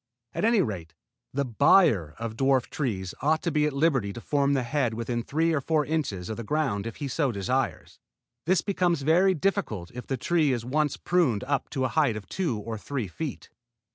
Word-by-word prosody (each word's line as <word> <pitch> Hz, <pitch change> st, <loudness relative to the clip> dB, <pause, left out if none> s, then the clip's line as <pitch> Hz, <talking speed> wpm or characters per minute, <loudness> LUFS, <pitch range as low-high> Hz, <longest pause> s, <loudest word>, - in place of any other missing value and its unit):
At -, -, -3 dB
any 225 Hz, -4 st, +4 dB
rate 85 Hz, -, -5 dB, 0.4 s
the 140 Hz, +1 st, -1 dB
buyer 115 Hz, -, +4 dB
of 115 Hz, -1 st, -5 dB
dwarf 135 Hz, 0 st, +2 dB
trees 95 Hz, -, -2 dB
ought 155 Hz, +2 st, +2 dB
to 170 Hz, -, 0 dB
be 150 Hz, -1 st, +2 dB
at 150 Hz, -, -3 dB
liberty 140 Hz, -8 st, +1 dB
to -, -, -7 dB
form 140 Hz, +2 st, +1 dB
the 130 Hz, -, +1 dB
head 120 Hz, -2 st, 0 dB
within 120 Hz, +1 st, -2 dB
three 160 Hz, +7 st, 0 dB
or 150 Hz, -, +1 dB
four 155 Hz, +1 st, +1 dB
inches 140 Hz, -, -2 dB
of 110 Hz, -, -4 dB
the 115 Hz, -, -5 dB
ground 115 Hz, -6 st, -1 dB
if 115 Hz, -, -6 dB
he 145 Hz, -, -4 dB
so 135 Hz, 0 st, 0 dB
desires. 120 Hz, +5 st, -2 dB, 0.5 s
This 185 Hz, -1 st, +3 dB
becomes 175 Hz, -7 st, 0 dB
very 180 Hz, +6 st, +4 dB
difficult 150 Hz, -, -1 dB
if 125 Hz, 0 st, -8 dB
the 135 Hz, -, -1 dB
tree 155 Hz, +1 st, +2 dB
is 120 Hz, -2 st, -3 dB
once 150 Hz, +2 st, 0 dB
pruned 160 Hz, -, +1 dB
up 140 Hz, +1 st, -1 dB
to 130 Hz, -3 st, -1 dB
a -, -, 0 dB
height 145 Hz, -8 st, +2 dB
of 105 Hz, -2 st, -7 dB
two 165 Hz, -, -1 dB
or 110 Hz, +1 st, -5 dB
three 130 Hz, -2 st, -3 dB
feet. 145 Hz, -, -6 dB
135 Hz, 205 wpm, -27 LUFS, 115-155 Hz, 0.5 s, any